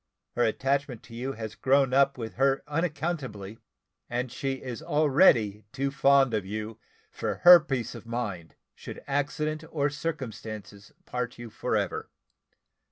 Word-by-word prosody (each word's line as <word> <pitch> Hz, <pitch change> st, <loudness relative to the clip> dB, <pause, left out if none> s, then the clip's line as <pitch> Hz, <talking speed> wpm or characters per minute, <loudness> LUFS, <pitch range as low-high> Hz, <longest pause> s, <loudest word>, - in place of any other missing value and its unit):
Her 120 Hz, -, +2 dB
attachment 135 Hz, +2 st, 0 dB
to 115 Hz, -, -14 dB
you 130 Hz, +4 st, -4 dB
has 110 Hz, -2 st, -6 dB
grown 135 Hz, +2 st, +2 dB
up 140 Hz, 0 st, +4 dB
with 115 Hz, -2 st, -5 dB
her 135 Hz, +1 st, +2 dB
unaccountably, 145 Hz, -, -3 dB, 0.5 s
and 125 Hz, +1 st, -2 dB
she 135 Hz, +2 st, -2 dB
is 130 Hz, -1 st, -6 dB
already 145 Hz, -, +3 dB
too 135 Hz, 0 st, -2 dB
fond 140 Hz, -3 st, +4 dB
of 105 Hz, -2 st, 0 dB
you 110 Hz, +3 st, -5 dB, 0.3 s
for -, -, -3 dB
her 175 Hz, 0 st, +11 dB
peace 135 Hz, -7 st, -3 dB
of -, -, -11 dB
mind, 100 Hz, -9 st, -4 dB, 0.2 s
should -, -, -10 dB
accident 150 Hz, +2 st, -1 dB
or 145 Hz, -2 st, 0 dB
circumstances 110 Hz, -9 st, -6 dB
part 125 Hz, -1 st, -4 dB
you 120 Hz, -2 st, -9 dB
for -, -, -2 dB
ever. -, -, -2 dB
130 Hz, 145 wpm, -28 LUFS, 115-140 Hz, 0.5 s, her